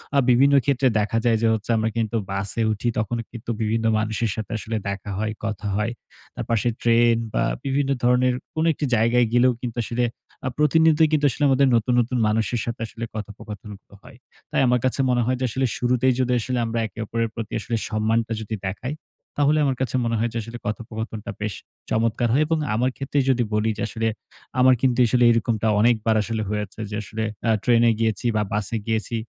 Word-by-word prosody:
আ - - +4
বিভিন্ন 135 +3 +5
ক্ষেত্রে 135 -1 +2
দেখা 110 +2 0
যায় 115 -2 +4
যে, 115 - +3
হচ্ছে 110 0 -4
আমরা 110 0 +1
কিন্তু 115 -1 -1 0.2
বাসে 100 +3 -2
উঠি 110 +3 -2
তখনও 115 +2 -2
কিন্তু 120 -1 -9
বিভিন্ন 110 +1 0
মানুষের 110 +1 -1
সাথে 110 -2 -5
আসলে 110 +1 -4
দেখা 100 0 -5
হয়, 110 0 -1
কথা 105 -1 -3
হয়। 105 +2 0 0.4
তার - - -4
পাশে 115 0 +1
ট্রেন 115 0 +4 0.2
বা - - +1 0.2
বিভিন্ন 135 0 0
ধরনের 125 +1 +3 0.2
কোন 155 - +1
একটি 145 - -3
জায়গায় 115 +2 +3
গেলেও 125 +1 +5
কিন্তু 120 -1 -5
আসলে 120 +2 -1 0.4
আ - - 0
প্রতিনিয়ত 160 +1 +4
কিন্তু 150 -2 +2
আসলে 140 +4 -3
আমাদের 135 +1 +4
নতুন, 115 +2 +1
নতুন, 125 +2 -2
মানুষের 110 +2 0
সাথে 115 0 -5
আসলে 115 - -9
কথোপকথনগুলো 105 -1 -9
হয়। - - -14 0.3
তাই - - +2
আমার 125 0 +3
কাছে 130 - 0
মনে 125 -1 +2
হয় 130 +1 0
যে, - - -2
আসলে 130 +4 0
শুরুতেই 125 +1 +2
যদি 125 -1 +1
আসলে 125 +3 -2
আমরা 115 +1 -2
একে 105 - -14
অপরের 115 +1 -1
প্রতি 115 -2 -6 0.4
সম্মানটা 110 +1 0
যদি 110 0 -4
দেখাই, 115 +8 -4 0.4
তাহলে 145 +1 +3
আমার 135 -2 +1
কাছে 130 -1 -1
মনে 115 0 0
হয় 115 +2 +1
যে, 115 - -3
আসলে 115 +2 -8
কথোপকথনটা 110 0 -5
বেশ 105 -1 -2 0.4
চমৎকার 115 +1 +1
হয় 145 +4 +4
এবং 165 0 +1 0.2
আমার 125 +3 +2
ক্ষেত্রেই 140 0 0
যদি 125 -2 +3
বলি 105 +1 +1
যে, 105 - -4
আসলে। 115 0 -2 0.5
আমার 130 0 +6
কিন্তু 130 -2 +2
আসলে 125 +1 +2
এরকমটা 115 -1 0
অনেকবার 110 0 +3
আসলে 110 +1 -3
হয়েছে 105 0 -4
যে, 105 - -3
আসলে 110 +2 -4 0.2
আ - - +3
ট্রেনে 120 -1 +4
গিয়েছি 110 -1 0
বা 105 - +2
বাসে 105 +2 -1
গিয়েছি 110 +1 -1
115 Hz, 195 wpm, -23 LUFS, 110-125 Hz, 0.5 s, আমার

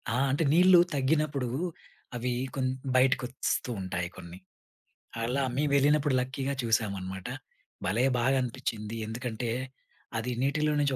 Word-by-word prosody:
ఆ! 115 - 0 0.2
అంటే 145 +5 +1
నీళ్లు 180 +1 +7 0.2
తగ్గినప్పుడు 140 -1 +1 0.7
అవి 125 +1 -1 0.2
కొన్ని 130 -1 0 0.2
బయటకి 130 0 +4
వస్తుంటాయి 95 -8 -2
కొన్ని. 85 0 -9 0.9
అలా 130 +4 0
మేమెళ్ళినప్పుడు 145 0 +3
లక్కీగా 135 +2 -2
చూసామనమాట. 100 -5 -1 0.6
భలే 110 +8 +2
బాగనిపించింది! 120 -4 -1
ఎందుకంటే 115 +1 -3 0.7
అది 115 +3 -2
నీటిలో 150 +3 +1
నుంచి 140 -2 +2
130 Hz, 105 wpm, -29 LUFS, 115-140 Hz, 0.9 s, నీళ్లు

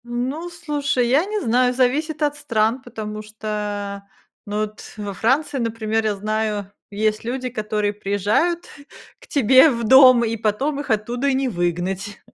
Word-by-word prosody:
Ну, 255 +8 -3
слушай, 295 -7 -1
я 280 +8 +3
не 425 +1 -2
знаю, 250 +1 +2
зависит 300 +5 0
от 290 0 +1
стран, 230 -4 0
потому 215 -4 -7
что, 210 -2 -5 0.4
ну, 210 +1 -2
вот 215 0 -5 0.2
во 205 -1 -5
Франции, 270 +7 0
например, 225 -1 -1
я 210 -1 +1
знаю, 210 -1 -2 0.2
есть 215 +1 -1
люди, 255 +2 -3
которые 210 -3 -2
приезжают 210 - 0 0.5
к - - -18
тебе 260 +2 +6
в 235 -4 -2
дом, 255 0 +7
и 230 0 -2
потом 245 +7 -1
их 285 - -6
оттуда 235 +5 -1
и 275 - +2
не 265 -1 0
выгнать. 180 +2 -2
230 Hz, 155 wpm, -21 LUFS, 210-265 Hz, 0.5 s, дом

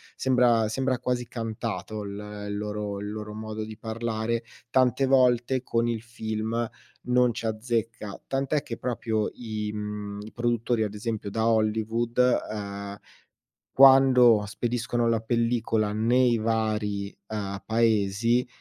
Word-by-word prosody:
sembra 120 -4 +3
sembra 130 +1 0
quasi 125 -1 -2
cantato 110 -3 -4
l 105 +1 -7
il 105 - -3
loro 105 -1 -3
il 105 0 -5
loro 105 0 -6
modo 110 0 -5
di 110 -1 -8
parlare. 115 0 -2 0.3
Tante 130 +1 +3
volte 130 -1 +3
con 115 -1 0
il 115 -2 -1
film 110 0 -3 0.4
non 125 -1 +3
ci 115 - -5
azzecca, 110 -2 -3
tant'è 135 +2 0
che 115 - -6
proprio 110 -3 -1
i, 110 -3 -4
mhmm, 105 -1 -5
i 110 - -10
produttori, 120 -1 0
ad 105 -1 -3
esempio 105 -2 -4
da 110 +1 0
Hollywood, 110 +1 0 0.3
uhm, 100 -1 -5 0.8
quando 130 -4 +7
spediscono 120 +2 -1
la 115 -1 +2
pellicola 115 -2 0
nei 120 +2 +3
vari, 110 -2 -1
uhm, 100 -2 -4
paesi 115 +1 +2
110 Hz, 130 wpm, -26 LUFS, 105-120 Hz, 0.8 s, quando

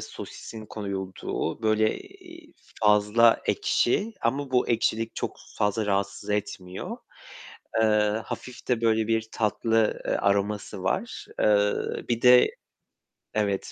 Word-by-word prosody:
sosisin 110 -1 -9
koyulduğu, 95 -3 -4
böyle, 110 0 +2
eee, 350 -4 -15 0.3
fazla 105 +2 +5
ekşi 205 - +1
ama 135 +4 -1
bu 125 -1 +2
ekşilik 115 -1 0
çok - - -3 0.2
fazla 105 +1 +1
rahatsız 100 0 -1
etmiyor. 95 -3 -4 0.9
Eee, 105 0 +2
hafif 125 - -8
de 125 -3 +2
böyle 110 -1 +2
bir 110 -1 0
tatlı, 110 0 +1
eee, - - -1
aroması 100 0 0
var. 190 - -2
Eee, 105 -1 +4 0.4
bir 120 -1 -1
de 125 0 +6 0.8
Evet, 100 -2 -1
110 Hz, 115 wpm, -26 LUFS, 105-115 Hz, 0.9 s, de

